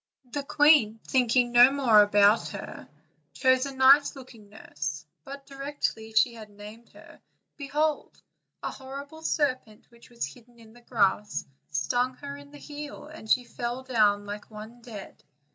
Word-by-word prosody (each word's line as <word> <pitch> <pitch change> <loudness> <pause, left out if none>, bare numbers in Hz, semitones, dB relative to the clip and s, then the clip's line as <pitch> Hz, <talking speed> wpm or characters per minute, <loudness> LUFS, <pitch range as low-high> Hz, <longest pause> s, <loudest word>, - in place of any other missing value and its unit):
The 290 - -2
queen, 280 -6 +4
thinking 245 -1 +2
no 245 +2 +7
more 250 -7 +5
about 205 +1 +4
her, - - -9 0.5
chose 260 +1 +2
a 275 - -8
nice 275 +3 +5
looking 240 -6 -14
nurse; 155 -6 -6 0.2
but 275 +4 -10
directly 275 -5 -4
she 230 +2 +3
had 220 -2 -11
named 210 +3 -13
her, - - -16 0.3
behold, 300 +1 -2 0.4
a - - -3
horrible 280 +4 -10
serpent, 255 -9 -2
which 235 +1 -19
was 235 -1 -4
hidden 240 -1 -15
in 220 -1 -17
the 240 - -18
grass, 210 -3 0 0.2
stung 245 - -1
her 280 +2 -8
in 285 0 -13
the 290 - -13
heel, 295 0 -9
and 300 -8 -12
she 250 - +3
fell 240 +1 -5
down 210 -5 +2
like 205 +1 -8
one 220 +2 -11
dead. 215 -5 -11
245 Hz, 155 wpm, -27 LUFS, 215-275 Hz, 0.5 s, no